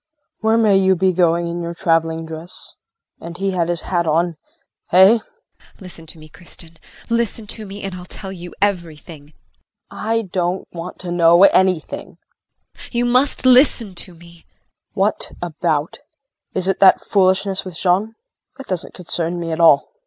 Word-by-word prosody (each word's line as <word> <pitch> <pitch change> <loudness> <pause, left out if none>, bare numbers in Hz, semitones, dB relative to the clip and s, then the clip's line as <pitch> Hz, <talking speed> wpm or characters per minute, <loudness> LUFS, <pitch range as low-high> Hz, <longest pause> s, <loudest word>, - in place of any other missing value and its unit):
Where 220 +1 +2
may 215 -4 +4
you 190 0 +3
be 185 +1 +1
going 170 -1 +2
in 170 +1 -4
your 170 0 -5
traveling 165 -2 0
dress? 160 +2 -9 0.5
and 170 +1 -9
he 195 +1 -1
had 175 -2 -1
his 175 -1 0
hat 175 -2 -1
on! 165 +2 +1 0.5
Hey? 190 +6 +6
JULIE. 465 - -29
Listen 180 -4 -11
to 160 - -8
me, 155 0 -14
Kristin, 165 0 -13 0.3
listen 230 -1 -1
to 215 0 -7
me 200 +1 -9
and 195 -1 -5
I'll 180 -1 -9
tell 190 -2 -7
you 175 -2 -9
everything. 165 -6 -4
KRISTIN. 150 - -25 0.5
I 225 +1 -1
don't 180 -1 -3
want 170 +1 -7
to 180 -1 -5
know 170 +1 +5
anything 185 -4 +2 0.6
JULIE. - - -13
You 240 0 +1
must 255 +3 +1
listen 250 -5 +4
to 175 0 -8
me 170 +1 -16
KRISTIN. 170 - -22 0.5
What 200 +1 +1
about? 155 -2 -2 0.6
Is 185 0 +1
it 195 - 0
that 195 - +6
foolishness 190 0 +1
with 185 -3 -8
Jean? 195 +5 0 0.4
That 270 - -9
doesn't 185 -3 -4
concern 175 -1 -3
me 165 -1 -4
at 160 - -3
all. 160 -4 +4
180 Hz, 170 wpm, -19 LUFS, 170-195 Hz, 0.6 s, Hey